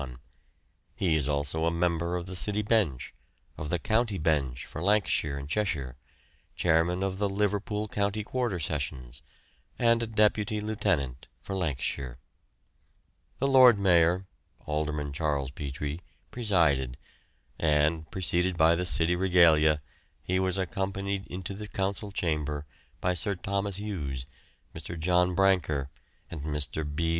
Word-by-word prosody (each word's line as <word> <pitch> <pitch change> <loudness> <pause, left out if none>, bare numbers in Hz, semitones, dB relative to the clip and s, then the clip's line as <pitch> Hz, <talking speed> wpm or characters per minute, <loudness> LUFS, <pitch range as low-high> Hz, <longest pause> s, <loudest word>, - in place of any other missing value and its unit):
He 85 -5 +1
is 75 -2 0
also 75 +3 -1
a - - +2
member 85 0 0
of 90 -1 -3
the 95 0 -5
city 105 +3 +1
bench, 100 - 0 0.4
of 75 - -5
the 90 - +1
county 110 +3 0
bench 75 -6 0
for 80 - -7
Lancashire 90 -7 +2
and 70 0 -6
Cheshire, 75 -9 -1 0.6
chairman 85 +2 +2
of 95 0 -2
the 100 -1 +1
Liverpool 105 +1 -1
County 100 +1 -1
Quarter 120 -5 -2
Sessions, 65 -5 -3 0.6
and 115 -1 +3
a 115 - -1
deputy 105 -1 +2
lieutenant 100 - -1
for 95 +9 -6
Lancashire. 70 -7 -2 1.2
The 135 - +1
Lord 130 -4 +7
Mayor 90 -1 +3 0.4
(Alderman 75 -1 -2
Charles 70 -3 -1
Petrie) 75 +1 -5 0.3
presided, 80 - +1 0.6
and, 80 +1 +2
preceded 90 -1 0
by 80 +1 +5
the 90 +2 0
city 85 0 +2
regalia, 80 -5 +4 0.4
he 95 +1 0
was 95 0 +1
accompanied 95 +1 -2
into 95 +2 -5
the 105 +2 -7
Council 100 +1 -2
chamber 75 -5 -2 0.4
by 90 - +1
Sir 95 +3 -1
Thomas 100 +1 -2
Hughes, 75 -11 -4 0.5
Mr. 80 +2 -6
John 90 +2 +2
Brancker, 85 -8 +2 0.4
and 80 - -5
Mr. 75 +1 -1
B. 75 +3 -1
85 Hz, 130 wpm, -28 LUFS, 75-100 Hz, 1.2 s, Lord